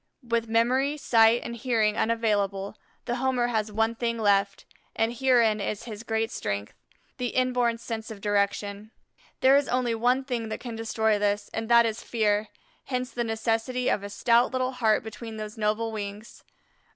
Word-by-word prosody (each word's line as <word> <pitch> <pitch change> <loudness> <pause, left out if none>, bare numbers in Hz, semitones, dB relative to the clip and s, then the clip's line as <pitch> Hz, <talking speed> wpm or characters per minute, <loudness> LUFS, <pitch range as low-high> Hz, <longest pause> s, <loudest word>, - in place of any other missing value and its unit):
With 230 -1 0
memory, 255 +6 +2
sight, 230 -3 +4
and 235 - -5
hearing 225 -3 +1
unavailable, 205 -4 0 0.3
the 240 0 -2
Homer 250 -1 +1
has 220 -2 -1
one 225 +2 +1
thing 230 0 -2
left, 200 -2 +1 0.3
and 225 +1 +1
herein 240 -4 +3
is 200 +1 -3
his 215 -3 -7
great 225 -1 -1
strength, 100 0 -4 0.4
the 250 -1 -1
inborn 245 -2 +1
sense 225 -1 -6
of 220 -2 -8
direction. 205 0 -1 0.5
There 265 +1 +6
is 285 - +1
only 245 -2 0
one 245 +4 +2
thing 240 -4 -3
that - - -4
can 240 -2 -6
destroy 220 -1 0
this, 205 0 -1
and 225 0 -4
that 235 0 +6
is 225 0 -2
fear, 215 -2 0 0.4
hence 255 -1 -3
the 240 - -2
necessity 225 +2 -1
of - - +1
a 200 - -6
stout 235 +4 +3
little 255 0 -1
heart 225 -4 +1
between 220 0 -8
those 215 0 -6
noble 220 +1 -1
wings. 210 0 -7
225 Hz, 170 wpm, -26 LUFS, 215-240 Hz, 0.5 s, There